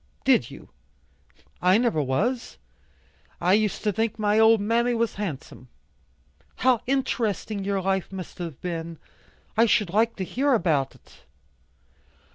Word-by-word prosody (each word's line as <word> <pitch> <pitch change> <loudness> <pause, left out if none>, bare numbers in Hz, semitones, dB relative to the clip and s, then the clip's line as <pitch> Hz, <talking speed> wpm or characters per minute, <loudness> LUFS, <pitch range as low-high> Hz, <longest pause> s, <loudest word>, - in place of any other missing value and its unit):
"Did 265 -3 +3
you? - - -13 0.9
I 185 +2 +5
never 230 -10 +1
was. 215 - -1 0.8
I 180 +2 +2
used 210 0 +1
to 210 - +2
think 220 +2 -1
my 210 0 +2
old 220 0 +6
mammy 235 +4 +1
was 230 0 0
handsome." 155 -9 -6 0.9
"How 250 -2 +2
interesting 225 -6 -1
your 195 -1 -1
life 190 0 -1
must 185 -2 -8
have 165 -6 -6
been! 165 -2 -5 0.6
I 230 +1 +4
should 210 -4 +2
like 225 +4 +2
to 190 - -4
hear 270 +9 0
about 155 - 0
it." - - -21
210 Hz, 135 wpm, -25 LUFS, 180-230 Hz, 0.9 s, old